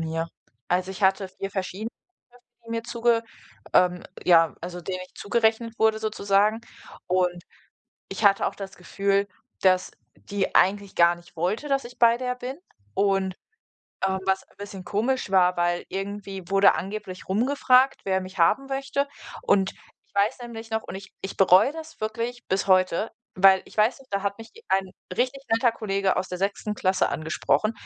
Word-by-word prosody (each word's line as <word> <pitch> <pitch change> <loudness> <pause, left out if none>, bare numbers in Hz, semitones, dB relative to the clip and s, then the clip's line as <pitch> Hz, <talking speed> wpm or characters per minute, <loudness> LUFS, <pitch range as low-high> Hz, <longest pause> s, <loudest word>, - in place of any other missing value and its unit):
mir. 165 +1 -2 0.4
Also, 185 +1 0
ich 195 +2 -8
hatte 190 0 +3
4 195 +1 -6
verschiedene, 195 +3 -4 0.8
die 230 - -10
mir 230 0 -2
zuge 235 -1 +1 0.5
ähm, 180 0 +3 0.2
ja, 165 -3 +5
also, 180 +1 -6
denen 185 +2 -4
ich - - -32
zugerechnet 225 +1 0
wurde 220 0 +3
sozusagen. 210 0 +1 0.5
Und 180 -1 0 0.7
ich - - -5
hatte 200 -1 +5
auch - - -5
das 195 -1 -8
Gefühl, 200 +2 0 0.3
dass 185 -1 +3 0.2
die 200 -1 -3
eigentlich 200 +1 +3
gar 170 0 +5
nicht 175 0 -18
wollte, 190 - -1
dass 275 -2 +1
ich 245 +1 -11
bei 235 0 +6
der 250 0 -2
bin. 250 +2 -6 0.4
Und, 195 - +1 0.7
ähm, 190 0 -1
was 190 0 +1
ein - - -27
bisschen 200 -2 -8
komisch 225 +4 -1
war, 180 -2 +4
weil 175 0 0
irgendwie 195 0 -5
wurde 195 0 +5
angeblich 190 -2 -6
rumgefragt, 255 +5 +3
wer 190 -1 +1
mich 185 0 -9
haben 210 +11 +3
möchte. 275 +1 -2 0.3
Und 195 -1 +2
ich - - -27
weiß 205 +6 +2
nämlich 230 -1 -8
noch 220 0 -1
und - - -8
ich 195 0 -9
ich 190 - -6
bereue 195 +7 +6
das 320 0 -10
wirklich 230 +3 -3
bis 190 +1 0
heute, 185 +3 +3 0.2
weil 190 0 +6
ich - - -16
weiß 215 +5 +3
noch, 270 - -17
da 200 -1 -1
hat 200 +1 -2
mich 225 0 -11 0.2
ein 195 0 +2 0.3
richtig 260 +2 0
netter 230 +1 +3
Kollege 195 -3 0
aus 185 - -1
der 180 - -5
6. 200 +2 -2
Klasse 185 -2 +1
angesprochen 160 +7 0
200 Hz, 170 wpm, -25 LUFS, 185-225 Hz, 0.8 s, bei